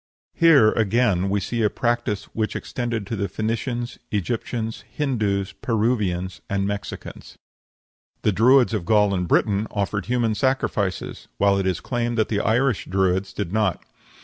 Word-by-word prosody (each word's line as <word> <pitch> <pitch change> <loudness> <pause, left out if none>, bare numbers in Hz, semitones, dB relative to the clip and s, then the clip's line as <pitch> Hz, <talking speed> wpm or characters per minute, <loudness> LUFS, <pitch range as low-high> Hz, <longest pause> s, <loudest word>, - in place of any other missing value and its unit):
Here 150 -11 +6
again 105 -4 +1
we 100 +1 +1
see 115 +4 -2
a 105 - +3
practice 120 -3 -1
which 110 -1 -2
extended 120 -4 -3
to 115 - -4
the 100 -1 -1
Phoenicians, 115 +4 -3
Egyptians, 110 +3 -3
Hindoos, 105 -9 -1
Peruvians, 105 -6 -1
and 100 0 0
Mexicans. 100 0 -6 0.9
The 105 - +3
Druids 120 +5 +4
of 105 -5 -1
Gaul 105 +1 +3
and 90 -2 -1
Britain 105 +4 +2
offered 100 -1 -2
human 120 -2 +1
sacrifices, 105 -6 -1
while 100 0 +3
it 95 - 0
is 95 - -1
claimed 120 -1 -2
that 110 - +1
the 105 - 0
Irish 120 +2 +1
Druids 95 0 0
did 100 -2 -4
not. 105 -5 0
105 Hz, 150 wpm, -23 LUFS, 100-120 Hz, 0.9 s, Here